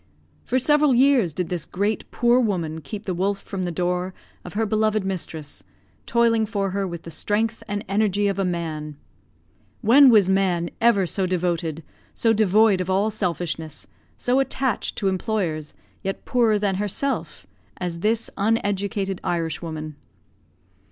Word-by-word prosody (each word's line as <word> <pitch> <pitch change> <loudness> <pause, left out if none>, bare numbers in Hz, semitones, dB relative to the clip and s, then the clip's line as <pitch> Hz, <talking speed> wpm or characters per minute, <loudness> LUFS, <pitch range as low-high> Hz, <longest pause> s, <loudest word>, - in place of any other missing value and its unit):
For 255 - +1
several 295 0 +4
years 255 - +4
did 170 +3 -3
this 175 -3 -2
great, 205 +3 -2
poor 240 +1 +3
woman 170 -9 -1
keep 200 +8 -7
the 190 - -2
wolf 195 +3 0
from 195 -2 -5
the 180 -1 -2
door 180 +2 -1 0.3
of 180 - -10
her 225 +1 +1
beloved 215 -1 +1
mistress, 160 -6 -5 0.5
toiling 230 -2 +3
for 200 -3 -1
her 195 0 -1
with 170 -2 -7
the 165 - -9
strength 220 +6 -1
and 205 0 -3
energy 205 0 +1
of 200 -1 -1
a - - +2
man. 160 -4 -3 0.8
When 260 +5 +7
was 210 -6 +6
man 185 -3 +1
ever 225 -5 +4
so 185 +2 0
devoted, 170 -3 -1 0.3
so 225 -1 +3
devoid 215 -1 +4
of 185 - -4
all 200 +3 +2
selfishness, 170 -6 -3 0.3
so 250 +2 +1
attached 265 -2 -1
to 200 - -1
employers, 185 -5 -2 0.3
yet 195 0 -4
poorer 230 -4 +3
than 200 -2 0
herself, 205 - -2 0.3
as 175 -2 -4
this 220 +4 0
uneducated 200 -2 -1
Irishwoman? 160 -2 -3
195 Hz, 150 wpm, -23 LUFS, 175-220 Hz, 0.8 s, When